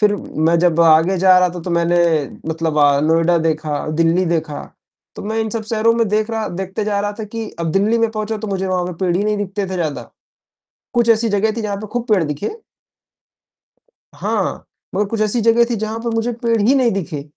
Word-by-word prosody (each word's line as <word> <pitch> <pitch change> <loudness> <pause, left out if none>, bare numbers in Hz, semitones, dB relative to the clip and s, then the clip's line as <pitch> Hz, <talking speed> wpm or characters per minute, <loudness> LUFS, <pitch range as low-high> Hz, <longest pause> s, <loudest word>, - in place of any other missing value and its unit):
फिर 210 -1 +4
मैं 165 -2 0
जब 170 -1 +2
आगे 165 +3 +5
जा 185 0 +6
रहा 180 0 +3
था - - -5
तो 180 - -5
मैंने 170 0 +2 0.5
मतलब 160 -1 -1
अ, 145 -1 +4
नोएडा 165 +3 +3
देखा, 155 -2 -2
दिल्ली 165 +3 +3
देखा, 160 -3 -2 0.5
तो - - -7
मैं 220 +2 -3
इन 220 -1 -2
सब 225 +1 -3
शहरों 225 0 +2
में 230 -1 +1
देख 215 +2 0
रहा 220 -1 -2
देखते 190 +3 -4
जा 205 -1 0
रहा 205 0 -2
था - - -3
कि 220 +1 -6
अब 165 -1 -1
दिल्ली 210 +5 +2
में 230 -1 +1
पहुँचा 215 0 -3
तो 215 0 -5
मुझे 190 -1 -2
वहाँ 185 -1 0
पे 180 - -4
पेड़ 175 -1 +1
ही 200 - 0
नहीं 210 0 0
दिखते 205 0 -3
थे - - -3
ज़्यादा, 160 -5 -3 0.8
कुछ 235 -2 +2
ऐसी 225 0 +3
जगह 205 +1 +1
थी - - -1
जहाँ 205 -2 -3
पे 215 - -6
खूब 240 - -1
पेड़ 195 -5 +4
दिखे। 150 +6 -3 1.6
हाँ, - - -2 0.3
मगर 205 - +1
कुछ 225 0 -2
ऐसी 215 +3 +1
जगह 230 +1 +4
थी 235 - 0
जहाँ 220 +1 -3
पर 235 +1 -3
मुझे 225 +2 0
पेड़ 230 -2 +1
ही 230 +6 +4
नहीं 255 -4 +3
दिखे, 165 -7 -4
200 Hz, 220 wpm, -18 LUFS, 170-220 Hz, 1.6 s, जा